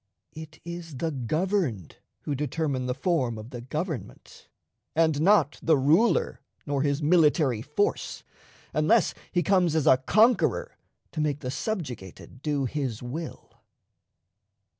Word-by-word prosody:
It 155 -1 -10
is 170 -4 -7
the 160 +5 -1
governed 145 - -1 0.2
who 145 - -3
determine 140 -2 -2
the 125 - -1
form 135 -6 0
of 110 +4 -9
the 120 -2 -6
government, 150 - -6 0.5
and 160 -2 +2
not 175 -5 +4
the 160 -2 +4
ruler 190 - +2 0.2
nor 140 -1 -1
his 145 +1 0
military 150 -7 +3
force, 150 - -2 0.5
unless 165 +8 +3 0.2
he 175 -1 +1
comes 180 -2 +3
as 160 - +1
a 130 - +6
conqueror 230 - +2 0.4
to 155 - -3
make 145 -1 -1
the 125 -2 -3
subjugated 130 - -5
do 145 -3 0
his 130 -4 -3
will. 155 +7 -7
150 Hz, 130 wpm, -27 LUFS, 130-170 Hz, 0.5 s, a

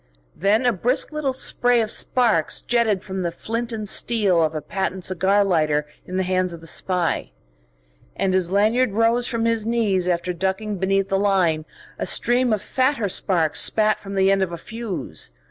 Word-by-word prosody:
Then 210 +6 +2
a 245 - +3
brisk 245 - 0
little 305 -3 -1
spray 245 -2 +2
of 220 -1 0
sparks 225 -11 +1
jetted 220 -5 +1
from 190 -2 -5
the 175 - -1
flint 230 +7 -4
and 215 -2 -5
steel 200 -6 +1
of 160 0 0
a - - -1
patent 190 +1 -3
cigar 190 +3 +2
lighter 155 -5 +1 0.2
in 185 - -4
the 190 - +1
hands 185 -1 0
of 170 - -8
the - - -13
spy. 175 - -1 0.9
And 190 -1 0
as 185 -2 +1
Lanyard 215 +4 +2
rose 230 +3 +2
from 230 -3 -1
his 230 -1 +1
knees 210 -6 0
after 180 +1 -1
ducking 190 +3 -2
beneath 195 +1 +1
the 195 -1 +1
line, 180 -6 +1 0.3
a - - -2
stream 245 0 +2
of 210 -2 0
fatter 260 -5 0
sparks 175 -4 +1
spat 215 -1 +2
from 195 0 -8
the 195 0 +3
end 195 0 +2
of 190 -2 -1
a 170 - -5
fuse. 195 - -6
195 Hz, 185 wpm, -22 LUFS, 180-230 Hz, 0.9 s, a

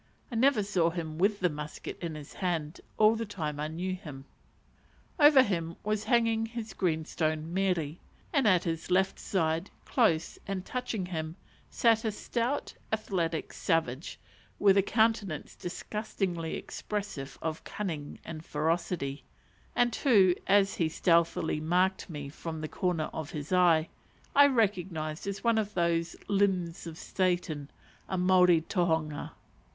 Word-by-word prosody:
(I - - -4
never 245 -2 +4
saw 185 -4 +2
him 165 -2 -5
with 200 +2 +2
the 180 - +3
musket 150 0 -7
in 165 -3 -4
his 150 -2 -9
hand 170 -4 -2 0.2
all 215 +1 +6
the 225 - -2
time 155 -9 -4
I 150 - -1
knew 175 +4 -3
him.) 145 -7 -8 0.9
Over 290 -3 +8
him 170 -6 -2
was 215 0 -1
hanging 225 -1 +2
his 225 -2 -6
greenstone 160 -1 -1
mere, 180 -5 0 0.4
and 280 -6 +3
at 185 -4 +4
his 165 -1 -3
left 190 +1 +2
side, 165 0 0 0.2
close, 190 -11 +1
and 190 -2 -3
touching 250 -6 -3
him, 160 -2 -4 0.3
sat 225 -1 +3
a 220 - 0
stout, 240 +6 -2 0.2
athletic 180 -7 -1
savage, 160 -5 -1 0.4
with 195 -2 +5
a 200 - +6
countenance 220 -6 0
disgustingly 180 -3 -3
expressive 200 -10 -5
of 160 -1 -4
cunning 160 -8 -5
and 160 -1 -7
ferocity; 155 -3 -1 0.5
and 245 -1 +3
who, 200 -9 +5
as 195 0 +4
he 165 -2 +1
stealthily 165 -1 +2
marked 180 +5 +1
me 145 -4 -5
from 160 +3 -6
the 155 - -3
corner 170 -2 -1
of 160 -2 -5
his 150 +2 -5
eye, 170 -3 +5 0.5
I 285 0 +8
recognized 185 - 0
as 200 0 -4
one 230 -2 +3
of 210 -1 -3
those 170 -1 +1
limbs 190 -4 0
of 160 -1 -7
Satan, 175 -7 -1 0.4
a 190 - -1
Maori 180 -2 +5
tohunga. 160 -3 -1
180 Hz, 145 wpm, -30 LUFS, 160-205 Hz, 0.9 s, Over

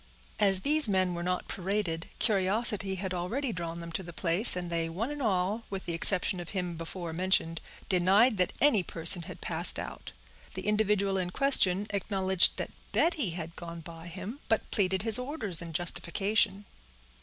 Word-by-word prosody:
As 195 -2 +3
these 300 -2 +3
men 185 -2 +1
were 170 - -5
not 180 +1 -3
paraded, 185 -3 -3
curiosity 200 -1 +3
had 190 0 -5
already 225 +9 -3
drawn 170 -1 -6
them 170 0 -9
to 165 - -3
the 170 -2 -10
place, 175 +6 +3
and 175 -1 -5
they 165 -1 -2
one 215 - -4
and 295 -1 -6
all, 200 -1 -1
with 195 -1 -6
the 170 - -4
exception 180 +2 +4
of 175 - -8
him 180 -3 -4
before 165 +1 -7
mentioned, 165 -2 0 0.3
denied 195 +6 +3
that 180 -1 0
any 275 -9 +3
person 170 +1 +4
had 165 - -11
passed - - +1
out. - - -8 0.4
The - - -7
individual 205 -2 0
in 180 -1 -3
question 200 -5 +4
acknowledged 190 -2 +1
that - - -5 0.2
Betty 320 - +1
had 165 -1 -7
gone 170 -1 -9
by 165 +1 -11
him, 190 - -8
but 225 - -1
pleaded 190 -1 0
his 225 0 +4
orders 250 - -3
in 170 -1 -8
justification. 185 +5 0
185 Hz, 175 wpm, -28 LUFS, 170-210 Hz, 0.4 s, exception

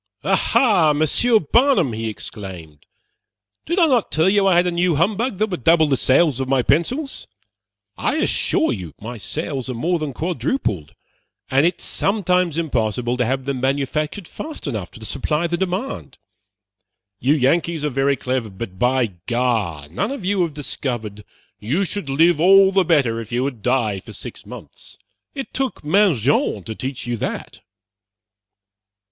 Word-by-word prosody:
"Aha, 210 - +3
Monsieur 155 - +3
Barnum!" 210 - +3
he 110 +1 -3
exclaimed, 90 -8 -9 0.8
"did 340 +4 -1
I 350 - +6
not 255 -8 +1
tell 160 +3 +2
you 195 0 +3
I 190 - +4
had 175 +1 +4
a 180 - 0
new 175 -1 +1
humbug 205 - 0
that 215 +1 0
would 175 -9 -4
double 165 -1 +5
the 145 -3 +2
sales 135 +1 +3
of 130 - -2
my 135 -2 +2
pencils? 255 - -1 0.7
I - - 0
assure 320 - +1
you 85 -8 -7
my 120 +3 -7
sales 130 - -4
are 125 - -3
more 170 +8 0
than 155 -2 -3
quadrupled, 140 - -2 0.6
and 135 +5 +4
it 175 - -2
is - - -7
sometimes 180 -5 0
impossible 120 -6 -1
to 125 - +1
have 130 +2 -2
them 135 -2 -3
manufactured 150 +7 -1
fast 315 0 -8
enough 110 - -4
to 110 - -11
supply 150 +8 -1
the 170 0 0
demand. 185 - -4 1.0
You 140 +5 +3
Yankees 155 +3 +1
are - - +1
very 135 +1 +1
clever, 125 -3 -2
but 95 -1 -8
by 125 +1 +2 0.2
gar, 115 - -1
none 100 - -2
of 275 -9 -6
you 195 0 +1
have 165 -4 -1
discovered 120 -7 -4 0.4
you 145 - 0
should 185 -4 -4
live 160 +3 +3
all 195 +2 +7
the 195 -1 +3
better 140 -9 +2
if 115 -1 -8
you 120 +2 0
would 130 -5 -4
die 115 -5 0
for - - -12
six - - -8
months. - - -12 0.4
It 270 -2 -6
took 265 - -2
Mangin 150 - +2
to 110 - -6
teach 130 +3 -5
you 120 -1 -2
that." - - -5
145 Hz, 165 wpm, -21 LUFS, 120-180 Hz, 1.0 s, all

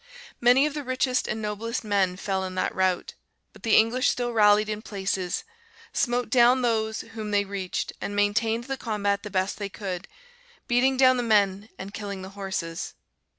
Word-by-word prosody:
Many 250 +4 +5
of 300 - -1
the 295 -1 -4
richest 255 0 0
and 220 0 -3
noblest 220 +3 -3
men 195 -4 +1
fell 190 0 -2
in 185 0 -5
that 185 - 0
rout, 185 -1 0 0.4
but - - -16
the 225 - +3
English 240 +4 +4
still 240 -1 -1
rallied 210 -1 +5
in 215 0 -3
places; 190 -4 -2 0.5
smote 245 -1 0
down 250 +1 +5
those 220 -2 0
whom 220 -1 -7
they 205 -1 +2
reached, 195 -2 -3
and 205 - -4
maintained 220 +3 +1
the 270 +2 -4
combat 205 -4 -1
the 210 - -7
best 190 0 -1
they 200 -1 -3
could; 190 -2 -5 0.6
beating 255 +2 +3
down 255 -1 +6
the - - +1
men 205 -2 +2
and 195 +1 -8
killing 200 -3 -5
the 190 - -7
horses. 190 -4 -5
210 Hz, 180 wpm, -26 LUFS, 195-240 Hz, 0.6 s, down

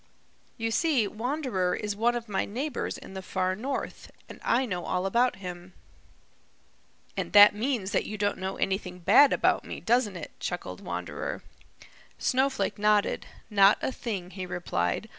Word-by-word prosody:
You 225 0 -2
see, 280 -4 +2
Wanderer 225 -5 -1
is 210 -1 -3
one 235 +3 +2
of 235 -1 -4
my 195 -2 0
neighbors 260 +6 -3
in - - -11
the 190 - -5
Far 185 0 -1
North, 265 +7 -5 0.2
and - - -11
I 260 +2 +2
know 180 -7 -3
all 180 +1 -1
about 240 +5 +2
him." 180 -1 -8 1.4
"And - - -4
that 205 0 +9
means 215 -3 -2
that - - 0
you 215 - -5
don't 205 -1 0
know 190 +1 -3
anything 190 -2 -2
bad 210 +11 +6
about - - +2
me, - - -7
doesn't 230 -4 +1
it?" - - -8
chuckled - - -5
Wanderer. - - -5 0.7
Snowflake 265 -3 0
nodded. 210 0 +2 0.2
"Not 200 0 +6
a - - 0
thing," 195 -8 -5
he 185 -2 -6
replied. 90 - -2
205 Hz, 160 wpm, -28 LUFS, 190-240 Hz, 1.4 s, that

